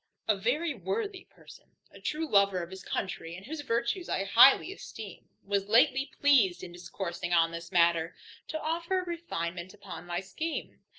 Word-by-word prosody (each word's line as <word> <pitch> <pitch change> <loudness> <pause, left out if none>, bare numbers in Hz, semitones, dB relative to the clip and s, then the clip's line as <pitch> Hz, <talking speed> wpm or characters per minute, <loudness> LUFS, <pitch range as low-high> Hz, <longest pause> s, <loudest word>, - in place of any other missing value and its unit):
A 215 - +4
very 285 - 0
worthy 320 - -4
person, - - -17 0.2
a - - -15
true 315 +1 -2
lover 200 - +3
of 170 - -9
his 190 0 -8
country, 170 -3 -4
and 190 +2 -11
whose 315 +2 -5
virtues 235 +8 -1
I 195 - 0
highly 255 - +6
esteem, - - -10 0.2
was 200 0 0
lately 255 +4 +4
pleased 250 -11 +4
in 175 - -7
discoursing 175 0 -5
on 165 -1 +4
this 170 0 -7
matter, 170 0 +3 0.3
to 315 - -3
offer 335 +4 -1
a - - -8
refinement 185 - -4
upon 195 -3 -9
my 175 0 -2
scheme. 310 - -5
200 Hz, 170 wpm, -30 LUFS, -, 0.3 s, highly